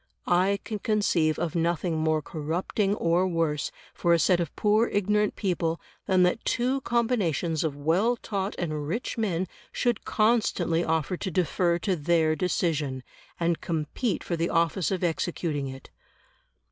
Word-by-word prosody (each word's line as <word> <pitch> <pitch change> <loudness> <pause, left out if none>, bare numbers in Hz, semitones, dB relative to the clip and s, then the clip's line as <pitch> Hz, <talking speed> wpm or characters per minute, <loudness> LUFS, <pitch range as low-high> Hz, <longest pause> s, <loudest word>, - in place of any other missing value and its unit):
I 185 +3 +3
can 215 -2 -4
conceive 190 -8 +1
of 165 -2 -2
nothing 170 0 0
more 155 -1 +1
corrupting 175 +7 -1
or 175 0 +2
worse 165 -4 -1 0.2
for 170 - +2
a - - +5
set 175 +2 +3
of 170 -4 -3
poor 215 +2 +3
ignorant 210 +1 +1
people 170 -4 -1 0.3
than 185 -1 +4
that 180 +5 +1
two 255 +3 0
combinations 200 - 0
of 155 -3 -1
well 170 +12 +2
taught 200 -3 -3
and 155 -4 -3
rich 225 +10 -2
men 190 -6 -1 0.2
should 240 -1 0
constantly 215 -7 +2
offer 160 +2 0
to 190 - -3
defer 175 0 +1
to 190 - +2
their 160 0 +2
decision, 155 -7 -1 0.4
and 170 -1 0
compete 165 - -2
for 170 - -2
the 165 +1 -1
office 165 +1 +1
of 190 -2 -2
executing 165 -4 -1
it. 135 0 -10
175 Hz, 150 wpm, -27 LUFS, 160-200 Hz, 0.4 s, a